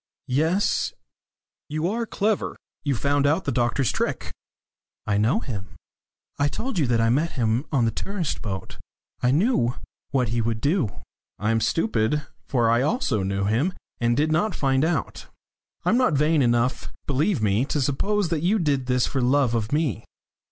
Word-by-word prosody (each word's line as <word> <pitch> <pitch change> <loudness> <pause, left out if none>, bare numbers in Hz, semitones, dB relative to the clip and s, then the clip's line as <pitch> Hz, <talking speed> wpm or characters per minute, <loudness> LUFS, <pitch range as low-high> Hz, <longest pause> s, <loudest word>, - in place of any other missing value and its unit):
"Yes. 165 +8 +1 0.8
You 155 +3 -1
are 230 +4 -2
clever 210 0 -1 0.3
you 140 -3 0
found 140 +3 +1
out 160 +6 +2
the - - 0
doctor's 120 +1 +1
trick." - - -2 0.7
"I 100 -1 +1
know 125 - +2
him. 100 -7 -6 0.6
I 145 - +3
told 225 - -3
you 145 - +2
that 120 -1 +2
I 115 0 +3
met 155 +7 +1
him 120 +2 0
on 130 -6 +2
the 115 - +1
tourist 185 - -3
boat. 95 -3 -6 0.4
I 125 - +3
knew 145 - +2 0.3
what 125 -4 +1
he 115 +1 0
would 115 -1 -1
do." 145 - +1 0.5
"I 105 +3 0
am 115 0 +1
stupid 150 - +1 0.2
for 120 -5 +2
I 120 +1 +3
also 140 - 0
knew 100 +1 -1
him, 120 - +1 0.3
and 120 0 +1
did 155 +1 +2
not 180 +4 +1
find 135 -1 +1
out. 170 +2 -2 0.6
I'm - - +3
not 255 -9 +3
vain 150 +2 +3
enough, 120 0 +1 0.2
believe 145 - +1
me, 105 +3 +2
to 150 - -1
suppose 175 +8 0
that 160 -3 -1
you 190 +6 +2
did 140 -8 0
this 125 -1 +2
for 135 - -1
love 130 0 +3
of 115 -1 -1
me." 150 - 0
140 Hz, 175 wpm, -24 LUFS, 120-160 Hz, 0.8 s, I